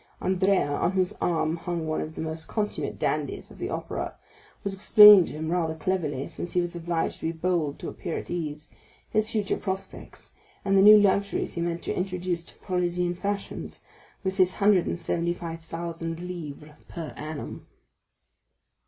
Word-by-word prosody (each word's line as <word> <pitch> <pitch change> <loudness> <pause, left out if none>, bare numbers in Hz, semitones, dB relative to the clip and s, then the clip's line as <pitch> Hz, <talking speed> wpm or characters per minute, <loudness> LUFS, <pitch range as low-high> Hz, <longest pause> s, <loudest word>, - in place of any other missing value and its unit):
Andrea, 190 +1 +2
on 145 +5 0
whose 185 -1 +1
arm 160 -1 +1
hung 170 -1 -3
one 155 0 -1
of 155 0 -6
the - - -5
most 160 0 -4
consummate 210 -2 -2
dandies - - -2
of - - -14
the - - -3
Opera, - - -4 0.5
was 200 - -1
explaining 210 -1 +9
to - - -8
him 160 +1 -3
rather 165 -3 0
cleverly, 155 -4 -2
since 175 - -6
he 180 - +3
was 175 0 -2
obliged 170 -1 -2
to - - -2
be - - 0
bold 165 -3 -1
to - - -7
appear 170 - -4
at - - -7
ease, 155 -3 -4 0.4
his 215 0 +2
future 210 -3 0
projects, 190 -1 -6 0.3
and 195 - +2
the 195 - +6
new 210 +2 +10
luxuries 200 -1 +2
he 170 - -3
meant 170 0 -2
to - - -2
introduce 180 -2 -2
to - - -11
Parisian 180 -1 0
fashions 200 +3 -4 0.4
with 190 0 -2
his 185 -1 +4
hundred 200 -3 +4
and - - -2
seventy 170 0 -1
five 165 -1 -6
thousand 165 0 -5
livres 155 -4 -7 0.2
per 165 -3 -6
annum. 150 0 -7
175 Hz, 175 wpm, -27 LUFS, 165-190 Hz, 0.5 s, new